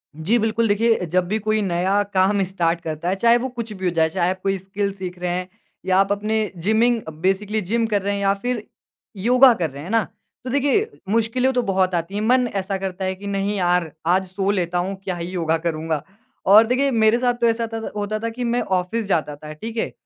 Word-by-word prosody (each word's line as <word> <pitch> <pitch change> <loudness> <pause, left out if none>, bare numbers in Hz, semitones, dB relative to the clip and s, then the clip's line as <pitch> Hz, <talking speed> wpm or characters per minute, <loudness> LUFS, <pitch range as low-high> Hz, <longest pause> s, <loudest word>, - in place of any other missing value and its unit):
जी 180 +10 +1
बिल्कुल, 225 +1 +1
देखिए, 220 -1 +2
जब 180 +2 0
भी 215 +4 0
कोई 215 +1 0
नया 190 +2 +1
काम 195 +1 +3
स्टार्ट 170 -2 -1
करता 160 +2 -3
है, 190 - +1
चाहे 235 +4 +4
वो 260 +2 -3
कुछ 235 -3 -6
भी 190 -1 -6
हो 180 - +2
जाए, 160 -1 +2
चाहे 175 +2 0
आप 185 0 -3
कोई 195 0 +1
स्किल 200 +2 -3
सीख 180 -2 -7
रहे 180 0 -2
हैं 180 +1 -2 0.4
या 185 0 +2
आप 195 0 +2
अपने 215 +1 0
जिमिंग 220 +5 +2 0.2
बेसिकली 205 +3 0
जिम 225 +5 0
कर 205 -3 0
रहे 200 +1 -1
हैं 200 - -2
या 195 0 +3
फिर 230 +2 -3 0.5
योगा 250 +5 +6
कर 170 -7 -2
रहे 140 +1 -10
हैं, 150 - -8
है 190 - -6
ना? 225 -1 +3 0.4
तो 255 - -5
देखिए, 285 - +2 0.2
मुश्किलें 230 +4 +2
तो 250 - +2
बहुत 190 -3 +1
आती 170 +3 -3
हैं। 210 - -1
मन 250 +2 +3
ऐसा 195 0 -1
करता 190 0 -4
है 190 0 -1
कि, 200 +2 -9
"नहीं 200 +1 -1
यार, 175 -3 +1
आज 185 +3 +2
सो 190 +1 -2
लेता 180 -3 -1
हूँ, 190 +3 -1
क्या 185 -2 -3
ही 170 0 -5
योगा 165 -3 0
करूँगा?" 160 -2 -2 0.4
और 215 +4 +8
देखिए 270 +3 +1
मेरे 225 -1 +4
साथ 245 -1 +2
तो 235 - +4
ऐसा 230 0 +1
त 225 - -14
था - - -5
होता 210 +1 -2
था 230 +1 -2
कि 245 +2 -5
मैं 240 +1 0
ऑफ़िस 190 +4 -1
जाता 155 -6 0
था, 150 +1 -10
ठीक 225 +9 -7
है? - - -1
195 Hz, 240 wpm, -22 LUFS, 180-225 Hz, 0.5 s, और